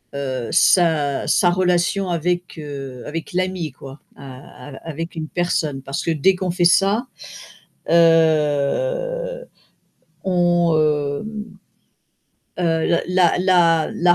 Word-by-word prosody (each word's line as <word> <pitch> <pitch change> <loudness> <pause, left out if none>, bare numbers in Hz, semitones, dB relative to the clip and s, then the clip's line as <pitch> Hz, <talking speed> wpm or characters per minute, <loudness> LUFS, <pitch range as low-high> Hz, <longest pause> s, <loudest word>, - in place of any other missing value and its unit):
heu, 130 -4 -3
sa 155 -6 +2
sa 175 - +3
relation 180 +1 0
avec, 175 +1 -2
heu, 135 -4 -8
avec 160 +2 -6
l'ami, 185 -3 -2
quoi, 135 +2 -12 0.2
a 130 0 -12
a 135 - -10
avec 165 +2 -6
une 160 -1 -5
personne, 155 -5 -2
parce 135 0 -4
que - - -3
dès 165 +5 +3
qu'on 185 0 -3
fait 175 0 0
ça, 200 +7 +3 0.9
heu, 170 - +1 0.8
on, 175 -3 +2
hem, 155 +8 -1 1.2
heu, 165 +1 +1
la 180 -2 +3
la 175 -3 +3
la 175 0 +3
170 Hz, 115 wpm, -20 LUFS, 145-180 Hz, 1.2 s, sa